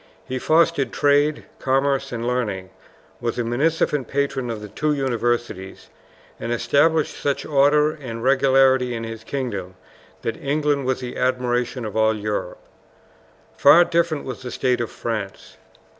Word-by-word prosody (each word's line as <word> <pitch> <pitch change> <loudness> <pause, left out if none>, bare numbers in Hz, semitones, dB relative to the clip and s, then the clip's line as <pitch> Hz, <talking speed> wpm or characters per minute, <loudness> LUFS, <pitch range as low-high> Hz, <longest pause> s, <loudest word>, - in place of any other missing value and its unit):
He 130 0 -4
fostered 155 -4 +2
trade, 145 +1 +2 0.2
commerce, 135 +1 +1
and 120 -1 -4
learning, 105 -7 -2 0.5
was 115 -1 -3
a 120 - 0
munificent 140 +2 0
patron 140 -3 -1
of 115 -2 -4
the 105 - -8
two 150 +9 -1
universities, 120 -7 -2 0.5
and 115 - -4
established 150 +6 +2
such 140 -1 -2
order 150 +1 +3
and 125 -7 -7
regularity 130 -1 +3
in 115 - -4
his 115 0 -7
kingdom 105 -9 -4 0.5
that 115 - -2
England 145 -1 0
was 130 - 0
the 125 -1 -6
admiration 125 -1 -1
of 105 - -6
all 110 0 +3
Europe. 105 -3 -3 1.0
Far 170 +5 +7
different 165 -3 0
was 130 -3 -6
the 125 - -6
state 125 -1 0
of 115 - -3
France. 110 -4 -5
130 Hz, 145 wpm, -22 LUFS, 115-140 Hz, 1.0 s, Far